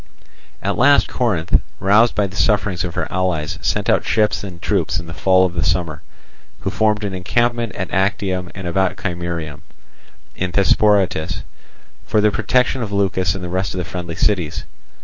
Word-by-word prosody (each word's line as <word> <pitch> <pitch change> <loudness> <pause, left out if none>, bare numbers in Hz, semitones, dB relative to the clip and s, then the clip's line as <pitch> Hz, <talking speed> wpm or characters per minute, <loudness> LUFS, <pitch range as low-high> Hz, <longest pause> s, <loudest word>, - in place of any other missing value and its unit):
At - - -1
last 140 +3 +5
Corinth, 95 -9 +1 0.2
roused 105 +5 +4
by 105 - +2
the 95 0 -7
sufferings 105 -3 +1
of 90 -2 -5
her - - -1
allies, 90 -5 -1
sent - - -1
out - - +3
ships 105 -2 +1
and 90 -4 -8
troops 85 -3 0
in 85 - -6
the 85 - -8
fall 95 +1 +3
of 90 - -2
the 85 -2 -1
summer, 80 -1 -1 0.6
who - - -2
formed 105 -1 +1
an 100 -2 -3
encampment 120 +5 0
at - - -4
Actium 95 -2 0
and 95 -1 -7
about 95 +2 0
Chimerium, 85 -5 -4 0.7
in 90 -1 -3
Thesprotis, 95 -4 +2 0.6
for 110 - +1
the 105 0 +4
protection 125 +4 +1
of 110 -3 -4
Leucas 95 -3 +1
and 95 - -6
the 90 - -4
rest 95 +1 -2
of - - -4
the 90 - -2
friendly 85 -1 -6
cities. 90 -5 0
95 Hz, 175 wpm, -19 LUFS, 85-105 Hz, 0.7 s, last